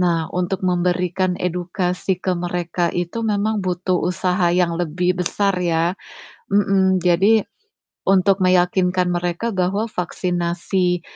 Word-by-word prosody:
Nah, 170 -3 +1
untuk 180 +1 -1
memberikan 180 +1 0
edukasi 180 +1 -2
ke 185 - +1
mereka 175 0 -2
itu 175 +6 -3
memang 210 0 0
butuh 180 0 0
usaha 180 0 +1
yang 175 -2 +2
lebih 180 +2 -1
besar 195 +2 0
ya, 170 0 +1 0.6
mhm. 195 -2 +3
Jadi, 190 +5 +4 0.7
untuk 195 0 +3
meyakinkan 180 0 +2
mereka 175 +6 -2
bahwa 190 +3 0
vaksinasi 180 0 -1
180 Hz, 115 wpm, -20 LUFS, 175-190 Hz, 0.7 s, Jadi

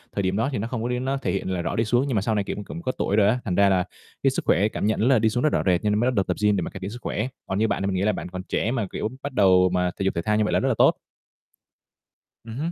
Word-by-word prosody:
thời 100 - 0
điểm 95 +1 0
đó 115 +6 +1
thì 130 - -2
nó 110 +3 -2
không 120 -2 -4
có 120 - -2
đến 125 +1 -2
nó 135 +1 0
thể - - -2
hiện 95 -1 -2
là 90 -2 -1
rõ - - -3
đi 115 - +1
xuống, 120 +4 +2
nhưng 130 - -1
mà 100 - +2
sau 110 +1 0
này, 100 - +1
kiểu, - - -4
cũng 170 - -7
có 130 - -1
tuổi 100 - 0
rồi 105 -1 +4
á, 120 +4 +2
thành 90 - -1
ra 100 +1 +4
là 95 -1 +2 0.4
cái - - +5
sức - - -3
khỏe 100 +6 +3
cảm 110 - -3
nhận 110 +2 +1
là 130 -3 +5
đi 110 +1 +3
xuống 120 +3 -1
nó 155 - +4
rõ - - 0
rệt, 90 -2 +2
cho 105 - +1
nên 105 +1 +1
mới 125 +2 +2
bắt - - -1
đầu 95 - +2
tập - - -3
gym 105 -1 +4
để - - 0
mà - - -4
cải 95 - -9
thiện 95 +1 -5
sức 120 +3 -9
khỏe. 110 +4 -2 0.2
Còn 95 - -2
như 110 - +3
bạn - - -1
thì - - 0
mình 95 - -1
nghĩ 90 - 0
là 105 +2 +2
bạn 95 - -6
còn 95 +1 -6
trẻ 110 - -1
mà, 115 -6 -1
kiểu, 110 - -3
bắt 145 - -4
đầu 95 -4 +5
mà 90 0 0
thể - - -1
dục 95 - 0
thể 85 - 0
thao 105 +3 +1
như 110 - +2
vậy 105 - -1
là - - +3
rất 135 - 0
là 125 - +1
tốt. - - +5 1.5
Ừm 115 +1 -8
hứm. 160 +4 -2
105 Hz, 375 wpm, -24 LUFS, 95-120 Hz, 1.5 s, cái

